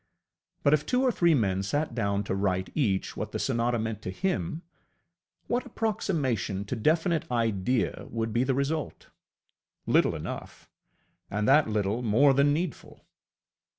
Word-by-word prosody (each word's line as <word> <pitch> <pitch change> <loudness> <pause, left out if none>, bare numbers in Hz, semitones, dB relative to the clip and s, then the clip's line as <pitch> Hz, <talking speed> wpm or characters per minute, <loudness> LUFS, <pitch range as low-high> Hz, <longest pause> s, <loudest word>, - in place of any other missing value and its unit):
But 140 - +4
if 150 -1 +3
two 250 +11 +1
or 255 - +3
three 170 -6 +3
men 95 -6 +1
sat 145 +9 -1
down 100 -3 0
to 100 - -3
write 95 -1 -1
each 105 -11 0
what - - -5
the - - -1
sonata 120 +1 0
meant 110 -1 -3
to 95 - -5
him, 175 - -2 0.8
what 245 +1 -1
approximation 145 - -1
to 125 - -3
definite 160 - +1
idea 115 0 0
would 115 -1 -3
be 120 +2 +2
the 130 0 0
result? 145 +3 -3 0.7
Little - - +3
enough - - -7 0.6
and 105 +2 -1
that 140 -2 +5
little 105 +2 0
more 125 +5 +4
than 140 +2 +4
needful. 160 -2 -4
125 Hz, 150 wpm, -28 LUFS, 105-155 Hz, 0.8 s, that